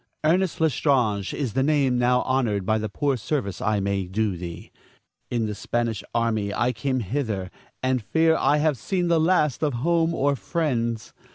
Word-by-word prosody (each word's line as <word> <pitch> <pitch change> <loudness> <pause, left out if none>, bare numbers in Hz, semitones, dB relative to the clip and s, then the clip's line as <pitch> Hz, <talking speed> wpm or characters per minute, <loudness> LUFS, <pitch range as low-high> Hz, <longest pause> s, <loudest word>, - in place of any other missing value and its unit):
Ernest 175 +3 +2
L'Estrange 125 - +1
is 130 -7 -3
the 135 - +1
name 135 -3 +2
now 125 +1 +3
honored 120 -7 0
by 110 +2 +1
the 110 0 -3
poor 140 +7 0
service 110 -4 -3
I 105 -1 +1
may 100 -1 -1
do 100 +1 -1
thee. 85 -1 -8 0.6
In 120 -2 0
the 105 - -3
Spanish 115 0 -2
army 110 -3 0
I 120 +4 +1
came 130 +2 -1
hither, 105 -5 -3 0.3
and 130 -1 +1
fear 160 +9 +2
I 150 -2 +3
have 150 -4 +1
seen 180 - -1
the 165 -1 +4
last 155 -5 +2
of 150 -3 +1
home 165 +5 +1
or 140 -1 +1
friends. 120 -9 -2
125 Hz, 175 wpm, -24 LUFS, 110-150 Hz, 0.6 s, the